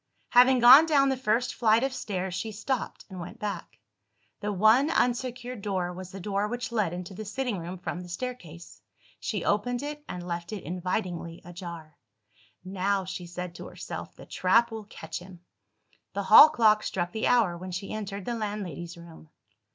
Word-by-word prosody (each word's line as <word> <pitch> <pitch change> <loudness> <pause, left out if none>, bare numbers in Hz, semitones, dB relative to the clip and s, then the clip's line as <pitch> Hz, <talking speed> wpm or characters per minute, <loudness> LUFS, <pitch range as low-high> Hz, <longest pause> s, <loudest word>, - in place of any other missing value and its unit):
Having 250 +1 +6
gone 265 +7 +10
down 280 -3 +4
the 265 - +1
first 245 -1 0
flight 225 0 +3
of 270 -1 0
stairs, 190 -6 -3
she 190 +5 -3
stopped 220 +4 -3
and 190 -2 -9
went 170 - -8
back. 200 -5 -5 0.6
The 210 0 -2
one 220 - +4
unsecured 250 -3 -1
door, 185 -3 -2
was 185 0 -8
the 195 - -9
door 200 +2 -1
which 245 +2 -4
led 215 -7 +1
into 180 +2 -6
the 215 +3 -6
sitting 230 -1 -3
room 175 +3 -6
from 175 0 -5
the 180 - -10
staircase. 175 -5 -7 0.4
She - - -3
opened 245 +5 0
it 295 0 -6
and 180 -1 -6
left 170 +2 -4
it 205 - -6
invitingly 180 -1 -3
ajar. 170 -3 -9 0.7
"Now," 195 +1 -1
she 180 -1 -6
said 180 0 -6
to - - -9
herself, - - -8
"the - - -12
trap 230 +6 +2
will 220 -1 -6
catch 200 - -7
him!" 180 -1 -13 0.7
The 200 - -2
hall 215 +10 +10
clock 220 -7 +4
struck 175 -4 -2
the 220 - -1
hour 225 -8 +3
when 185 +2 -7
she 185 +3 -5
entered 200 -2 -5
the 240 - -2
landlady's 200 -7 -5
room. 165 -2 -13
200 Hz, 180 wpm, -28 LUFS, 180-235 Hz, 0.7 s, gone